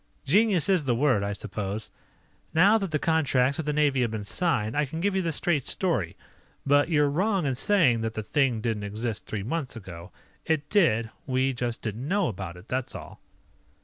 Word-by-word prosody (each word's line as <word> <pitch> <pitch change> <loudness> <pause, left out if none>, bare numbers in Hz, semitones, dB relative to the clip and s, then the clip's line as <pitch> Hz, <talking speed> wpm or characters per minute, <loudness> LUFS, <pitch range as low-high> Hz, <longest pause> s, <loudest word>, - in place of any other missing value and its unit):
"Genius 195 0 +3
is 185 -6 +2
the 125 -3 +2
word, 125 -5 +2
I 100 0 -2
suppose. 105 +1 -5 0.6
Now 200 +7 +6
that 195 -3 -3
the 155 - 0
contracts 140 -4 +2
with 160 - -4
the - - +2
Navy 145 -3 +2
have 120 - +1
been 110 -1 -4
signed, 110 - 0
I 150 - +2
can 150 +3 -5
give 200 +3 +1
you 190 - +2
the 170 -2 -1
straight 155 -2 0
story. 145 - -1 0.5
But 145 +2 +3
you're 150 -3 +3
wrong 185 +4 +1
in 135 - +1
saying 135 - +3
that 110 0 -3
the 110 - -3
thing 125 -2 +1
didn't 110 -2 -2
exist 105 +2 -4
three 105 -3 -4
months 135 +3 -3
ago. 90 -4 -10 0.3
It 155 -2 -1
did. 115 - +3 0.2
We 130 0 +1
just 120 -1 -3
didn't 115 +4 -4
know 195 +1 +1
about 95 -4 -6
it, 90 +5 -15
that's 130 0 -3
all." - - -10
135 Hz, 200 wpm, -26 LUFS, 110-160 Hz, 0.6 s, Now